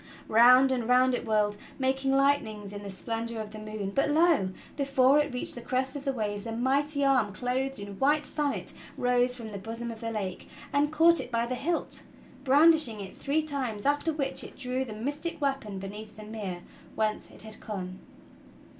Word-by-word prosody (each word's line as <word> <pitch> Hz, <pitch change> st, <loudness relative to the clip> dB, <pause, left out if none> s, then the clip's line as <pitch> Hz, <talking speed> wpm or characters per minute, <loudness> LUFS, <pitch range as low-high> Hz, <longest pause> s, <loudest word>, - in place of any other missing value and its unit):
Round 250 Hz, +4 st, +7 dB
and 245 Hz, -3 st, -1 dB
round 255 Hz, +1 st, +5 dB
it 245 Hz, -, -2 dB
whirled, 210 Hz, -1 st, +2 dB, 0.2 s
making 270 Hz, 0 st, +1 dB
light 275 Hz, +1 st, +4 dB
nings 210 Hz, -2 st, -8 dB
in 205 Hz, -, -6 dB
the 200 Hz, -, -7 dB
splendor 225 Hz, +3 st, -4 dB
of 215 Hz, -1 st, -5 dB
the 215 Hz, -, -8 dB
moon; 215 Hz, -2 st, -5 dB
but 275 Hz, +7 st, +1 dB
lo! 315 Hz, -, +4 dB, 0.3 s
before 275 Hz, 0 st, +4 dB
it 295 Hz, -1 st, 0 dB
reached 250 Hz, -, -2 dB
the 240 Hz, -, -6 dB
crest 260 Hz, +2 st, -1 dB
of 285 Hz, 0 st, -6 dB
the 275 Hz, -, +2 dB
waves 210 Hz, -3 st, -3 dB
a -, -, -3 dB
mighty 280 Hz, +4 st, +1 dB
arm 255 Hz, -7 st, +3 dB
clothed 260 Hz, +4 st, -2 dB
in 200 Hz, -1 st, -8 dB
white 295 Hz, +2 st, +3 dB
samite 295 Hz, -2 st, -2 dB, 0.2 s
rose 245 Hz, 0 st, +2 dB
from 230 Hz, -3 st, -7 dB
the 200 Hz, -2 st, -6 dB
bosom 230 Hz, +3 st, -5 dB
of 225 Hz, -, -10 dB
the 230 Hz, -, -3 dB
lake 200 Hz, -5 st, -4 dB, 0.2 s
and 290 Hz, +1 st, +2 dB
caught 330 Hz, +2 st, +5 dB
it -, -, -5 dB
by 230 Hz, 0 st, +1 dB
the 245 Hz, -, -3 dB
hilt, 305 Hz, +7 st, -1 dB, 0.4 s
brandishing 285 Hz, -4 st, +5 dB
it 195 Hz, -1 st, -8 dB
three 300 Hz, +3 st, 0 dB
times, 260 Hz, -9 st, -3 dB
after 290 Hz, +3 st, +2 dB
which 285 Hz, -3 st, -2 dB
it -, -, -11 dB
drew 255 Hz, 0 st, -1 dB
the 230 Hz, -5 st, -7 dB
mystic 290 Hz, +9 st, -4 dB
weapon 270 Hz, -8 st, -2 dB
beneath 205 Hz, +3 st, -8 dB
the 215 Hz, -, -9 dB
mere 205 Hz, -5 st, -6 dB, 0.3 s
whence 215 Hz, -1 st, -1 dB
it -, -, -9 dB
had 220 Hz, 0 st, -9 dB
come. 185 Hz, -3 st, -6 dB
250 Hz, 200 wpm, -28 LUFS, 215-275 Hz, 0.4 s, Round